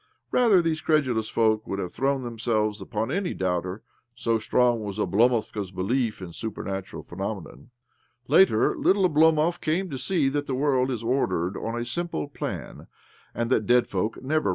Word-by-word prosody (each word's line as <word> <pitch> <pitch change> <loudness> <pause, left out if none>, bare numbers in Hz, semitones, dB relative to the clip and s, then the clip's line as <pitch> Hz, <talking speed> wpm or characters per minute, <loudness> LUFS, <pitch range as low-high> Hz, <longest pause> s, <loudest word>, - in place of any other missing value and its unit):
Rather 215 -8 +4
these 160 -1 -1
credulous 130 -8 +1
folk 110 -1 +1
would 100 - -3
have 90 -3 -4
thrown 135 +1 0
themselves 110 -3 -1
upon 110 +4 -3
any 190 +2 -1
doubter 90 +2 -2 0.2
— 120 0 -47
so 115 -1 +2
strong 120 +1 +2
was 100 -1 -5
Oblomovka's 110 -2 +1
belief 105 +3 -1
in 85 -2 -8
super 110 +3 -5
natural 95 -1 -5
phenomena. 95 +1 -6 0.6
Later, 150 - +4
little 190 -1 +3
Oblomov 160 +1 +3
came 175 +4 -1
to 135 - -4
see 155 +1 +1
that 145 +1 -2
the 130 - -1
world 130 -1 +2
is 120 -3 -3
ordered 95 -7 0
on 115 +4 -3
a 120 - -3
simple 120 - -3
plan, - - -6 0.5
and 120 +1 -2
that 110 -5 +2
dead 125 0 +5
folk 100 +3 -2
never 155 -3 +1
120 Hz, 170 wpm, -26 LUFS, 105-145 Hz, 0.6 s, dead